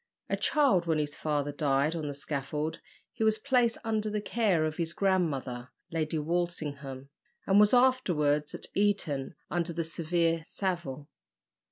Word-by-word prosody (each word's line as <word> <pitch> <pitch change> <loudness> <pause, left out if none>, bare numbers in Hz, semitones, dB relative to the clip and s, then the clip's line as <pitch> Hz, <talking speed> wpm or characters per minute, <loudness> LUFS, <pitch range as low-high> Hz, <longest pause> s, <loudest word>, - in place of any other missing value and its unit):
A - - +3
child 260 - +3
when 160 -1 +2
his 150 -1 -2
father 145 -2 -1
died 145 +1 +1
on 155 -3 -3
the 145 - -4
scaffold, 150 +2 -3 0.3
he 225 - -2
was 220 0 +4
placed 245 -1 +2
under 215 -1 0
the 210 0 -1
care 205 -6 +1
of 155 0 -3
his 165 -1 -1
grandmother, 145 -11 0 0.2
Lady 160 -1 -1
Walsingham, 150 -5 -3 0.4
and 195 +1 +5
was 210 0 +6
afterwards 170 - +3
at - - -2
Eton 180 -9 0 0.2
under 175 0 -1
the 165 0 -1
severe 165 0 0
Saville. 170 -7 -3
165 Hz, 150 wpm, -29 LUFS, 150-200 Hz, 0.4 s, was